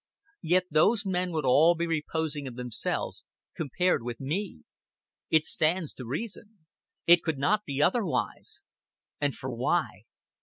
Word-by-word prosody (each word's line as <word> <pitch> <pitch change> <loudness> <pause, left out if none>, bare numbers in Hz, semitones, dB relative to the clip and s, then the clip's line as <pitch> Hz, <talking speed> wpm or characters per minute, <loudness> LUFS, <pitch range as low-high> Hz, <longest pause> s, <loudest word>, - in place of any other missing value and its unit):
Yet 180 +2 +3
those 200 +8 +3
men 180 -1 -1
would 155 -4 -2
all 155 +7 +5
be 170 +1 -1
reposing 155 -2 -2
of 125 - -8
themselves 125 -2 -2 0.3
compared 180 +3 0
with 120 -1 -6
me. 155 - -4 0.7
It 160 -1 +3
stands 160 0 +1
to 125 - -9
reason. 205 - -6 0.4
It 170 0 +7
could 160 -4 -2
not 210 +10 +1
be 140 +1 0
otherwise. 190 -1 -1 0.6
And 145 -2 0
for 130 - -5
why? 120 +2 -1
160 Hz, 140 wpm, -28 LUFS, 140-180 Hz, 0.7 s, It